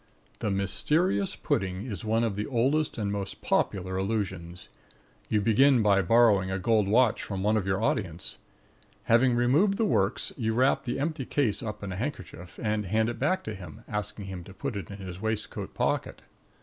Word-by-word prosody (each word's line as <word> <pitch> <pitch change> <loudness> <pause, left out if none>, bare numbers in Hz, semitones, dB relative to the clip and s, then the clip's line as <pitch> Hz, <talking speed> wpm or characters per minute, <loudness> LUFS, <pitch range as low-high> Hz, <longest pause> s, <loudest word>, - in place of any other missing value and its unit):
THE 105 - -1
MYSTERIOUS 100 - +1
PUDDING 95 +2 -2
is 105 -9 -5
one 110 +1 +1
of 110 -4 0
the 105 +1 -3
oldest 140 +5 +1
and 105 -3 -1
most 100 -1 -4
popular 95 -1 0
illusions. 95 -4 -3 0.6
You 105 - +2
begin 120 +3 +4
by 100 -2 +4
borrowing 100 -1 +4
a 95 - -1
gold 105 +1 +2
watch 115 +2 +3
from 95 -2 -4
one 105 +1 +3
of 100 -3 0
your 95 +3 0
audience. 90 -7 -2 0.6
Having 120 +2 +4
removed 145 +12 +3
the 225 - +2
works, 105 - +1
you 110 -3 -1
wrap 130 +3 +2
the 120 +2 -2
empty 150 -2 -2
case 130 -7 0
up 105 -3 -6
in 100 - -4
a 90 - -4
handkerchief 95 - -6
and 105 -2 0
hand 110 +4 +1
it 120 - -5
back 155 +8 +1
to 110 - -5
him, 90 -6 -10
asking 105 -1 -4
him 95 -2 -6
to 95 - -12
put 140 +2 -4
it 100 - -5
in 100 - -7
his 95 -2 -8
waistcoat 110 -1 -3
pocket. - - -1
105 Hz, 190 wpm, -28 LUFS, 95-120 Hz, 0.6 s, begin